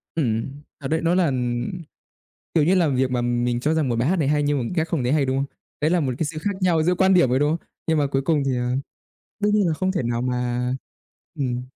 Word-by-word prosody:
Ừm, 135 0 -1 0.2
thật 135 - -4
đấy, 160 +2 0
nó 170 +2 +2
là, 185 - +3
ừm, 125 +1 -1 0.8
kiểu 155 -3 +4
như 180 +4 +3
là, 170 -4 +3
việc 130 -1 +1
mà 125 -1 0
mình 120 0 0
cho 155 +4 +1
rằng 155 -5 +1
một 120 - 0
bài 125 +5 +1
hát 190 - +2
này 145 -3 +1
hay 150 0 +2
nhưng 145 -1 +1
mà 120 - -2
khác 160 0 +1
không 155 -6 -1
thấy 125 +3 +1
hay, 150 -3 +3
đúng 130 +1 0
không? 140 +1 0 0.3
Đấy 155 +2 +2
là 180 - +3
một 130 -4 0
cái 160 - 0
sự 155 +1 -4
khác 205 - -1
nhau 170 -4 +3
giữa 180 +3 +2
quan 190 +1 +4
điểm 175 -8 +5
thôi, 130 +1 +2
đúng 145 +1 +2
không? - - -20 0.2
Nhưng 160 -1 +2
mà 145 - +2
cuối 135 0 -1
cùng 150 -1 +1
thì, 130 -2 0
ờ 125 +1 -1 0.7
đương 210 0 +2
nhiên 205 -3 +3
là 160 - +1
không 185 +3 0
thể 175 - -1
nào 120 0 -1
mà 125 0 -1 0.7
ừm. 125 -2 -1
145 Hz, 275 wpm, -23 LUFS, 125-165 Hz, 0.8 s, điểm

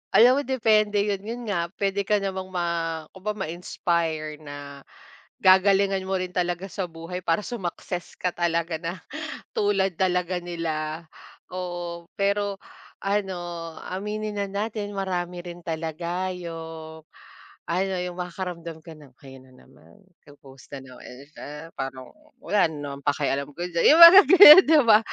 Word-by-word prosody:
Alam 250 +4 +6
mo - - 0
depende 215 -5 +2
yun, 205 -2 -1
yun 230 +5 -7
nga 170 -3 -1
puwede 200 0 -1
ka 210 - +3
namang 190 -2 -3
ma 180 -2 -3 0.5
kumbaga 210 +3 -5
ma-inspire 160 -2 -3
na 145 -2 -10 0.6
gagalingan 195 +1 +4
mo 190 - -1
rin 185 0 -4
talaga 175 +1 -1
sa 190 -2 -3
buhay 165 +2 -7
para 170 +5 0
sumaccess 180 -5 -6
ka 180 - -1
talaga 170 -1 -1
na 170 +2 -6 0.5
tulad 195 -2 +1
talaga 180 -1 0
nila, 165 -2 -4 0.5
oo. 175 -2 -5 0.2
Pero 200 0 0 0.4
ano, 195 -1 -1 0.5
aminin 210 +2 -4
na - - 0
natin 205 +1 -4
marami 180 -2 -3
rin 175 0 -9
talaga 170 +3 -3
yung, 160 -2 -8 0.7
ano 190 +3 -1
yung 180 -1 -6
makakaramdam 175 -2 -6
ka 165 - -10
ng, 145 -4 -17
"ayan 130 -1 -13
na 130 - -20
naman 135 +9 -21 0.3
po-post 135 -2 -17
na - - -8
naman 130 -1 -13 0.3
siya 150 +3 -9
parang 135 -1 -6 0.3
wala 200 -4 +2
rin 150 -2 -8
naman 140 -1 -7
pakialam 140 -1 -1
ko 175 - -5
diyan" 170 -1 -1
yung 330 - +4
mga 360 +4 +12
ganyan 375 -3 +11
di 315 -1 +6
ba? 220 -2 +7
180 Hz, 145 wpm, -24 LUFS, 165-200 Hz, 0.7 s, mga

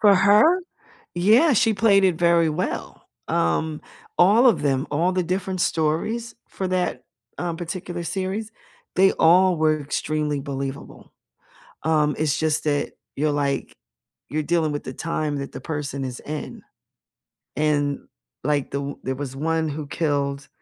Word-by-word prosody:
For 205 -2 +6
her? 210 - +5 0.5
Yeah, 220 - +5
she 225 -1 +3
played 195 -2 +4
it 180 -3 +3
very 170 -1 +4
well. 160 +4 -4 0.2
Um, 150 - 0 0.4
all 210 +8 +6
of 230 - +4
them, 135 -1 +1
all 170 +5 +1
the 185 0 +1
different 185 +1 -2
stories 195 +11 -1
for 190 -1 -4
that, 180 -9 -1 0.3
um, 170 -2 -2
particular 175 0 -5
series, 195 +5 -3 0.4
they 190 +1 +5
all 180 +2 +5
were 155 -1 +2
extremely 150 0 -2
believable. 135 -1 -6 0.7
Um, 150 -2 +2
it's 150 -1 +1
just 155 -1 0
that 145 -1 0 0.2
you're, 150 +2 0
like 140 -2 -1 0.5
you're 155 +4 -1
dealing 160 -1 +1
with 145 - -3
the - - -5
time 155 -2 -2
that 140 0 -5
the - - -7
person 145 -3 -4
is 125 -1 -5
in, 150 0 -6 0.9
and 145 -1 0 0.4
like, 145 -1 0
the 140 - -2
o 140 0 -6
there 130 +1 -2
was 135 -1 -6
one 160 +2 0
who 150 0 -5
killed 140 -2 -1
155 Hz, 150 wpm, -23 LUFS, 145-185 Hz, 0.9 s, For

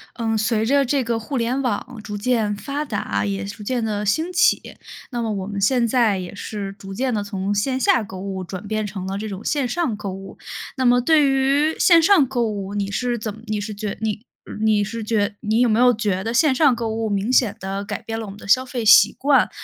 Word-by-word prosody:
嗯， 225 -2 -1
随 220 0 +1
着 280 +4 +3
这 265 +1 +1
个 235 0 -1
互 225 +5 -4
联 245 +3 0
网 245 0 -3
逐 210 -1 -5
渐 220 -1 0
发 280 +8 -4
达， 195 - -2
也 100 -1 -3
逐 100 - -8
渐 245 +2 -1
地 210 -1 -2
兴 315 - 0
起， 350 0 +2 0.4
那 240 -1 -2
么 225 -1 -2
我 195 -2 -3
们 200 -1 -4
现 240 +3 +3
在 230 -4 +2
也 180 +1 -7
是 200 -1 -5
逐 195 -1 -10
渐 255 +4 -1
地 210 -2 -1
从 200 -1 -3
线 260 +6 0
下 245 -2 +3
购 190 -2 -9
物 190 -1 -5
转 190 +3 -7
变 215 0 -1
成 190 -2 -6
了 195 +1 -3
这 215 +1 -5
种 195 0 -7
线 285 -3 0
上 325 -5 -1
购 205 -2 -5
物。 195 +1 -9 0.4
那 260 - -1
么 245 0 +5
对 295 +2 +4
于 275 +4 +2
线 335 -2 +6
上 360 -5 +5
购 245 -2 -1
物， 200 -2 -5
你 200 -1 -2
是 245 +3 -1
怎 215 -1 -4
么 220 - -13
你 215 -2 -2
是 210 +1 -5
觉 205 0 -5
你 220 +1 -3 0.3
你 215 -1 +2
是 225 +3 -5
觉 210 -2 0
你 220 +1 +1
有 245 - +4
没 220 +1 +2
有 250 0 +6
觉 205 -4 -1
得 225 - -2
线 285 +3 +4
上 275 -2 +4
购 230 -1 -3
物， 225 0 -2
明 200 +3 -1
显 240 -5 +3
地 195 0 -4
改 - - -5
变 225 0 -5
了 225 - -5
我 - - -8
们 200 - -12
的 - - -12
消 255 +6 +4
费 250 -2 -4
习 220 0 +7
惯？ 280 0 +3
220 Hz, 265 characters per minute, -21 LUFS, 205-250 Hz, 0.4 s, 习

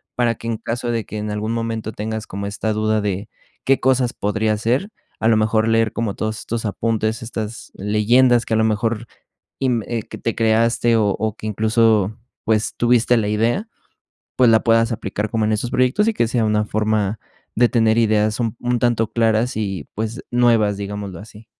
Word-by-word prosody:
para 120 -1 +1
que 115 - -9
en 115 -1 -1
caso 120 +2 -4
de 115 -2 -1
que 110 - -7
en 105 0 -3
algún 105 +1 -2
momento 115 -1 -3
tengas 110 0 -4
como 100 +1 -5
esta 110 +2 -2
duda 110 0 +1
de 100 0 -3 0.3
qué 135 0 +3
cosas 130 -2 +2
podría 105 +1 0
ser, 125 - 0 0.3
a 110 - +1
lo 115 -1 +4
mejor 110 +1 +2
leer 115 0 +2
como 115 -4 -2
todos 110 +1 -3
estos 115 0 -4
apuntes, 110 +1 -1
estas 115 -1 -6
leyendas 115 +4 +3
que 110 - 0
a - - +2
lo 110 - +3
mejor 110 +1 0 0.6
inv 125 -4 +1
eh, 115 -2 -2
que - - -10
te 115 - -2
creaste, 115 +1 +2
o 110 -2 +2
o 110 -1 -1
que 110 - -8
incluso, 110 -1 +2 0.3
pues, 110 0 0
tuviste 120 0 +3
la 110 -3 0
idea, 115 - 0 0.7
pues 125 -2 +5
la 110 -1 +5
puedas 115 0 +3
aplicar 105 -1 -3
como 110 -1 0
en 110 - +1
esos 110 +3 -1
proyectos 130 - +2
y 225 - +2
que 120 - +1
sea 120 0 0
una 105 0 +1
forma 105 -1 0 0.4
de 120 +1 +4
tener 115 -2 +2
ideas 110 -1 +2
un 115 -1 -1
un 120 0 0
tanto 115 -2 +1
claras 115 +1 +1
y, 100 -4 -3
pues 110 +3 -4
nuevas, 115 -4 +3
digámoslo 100 -3 -6
así. 110 +1 -13
110 Hz, 195 wpm, -20 LUFS, 105-115 Hz, 0.7 s, pues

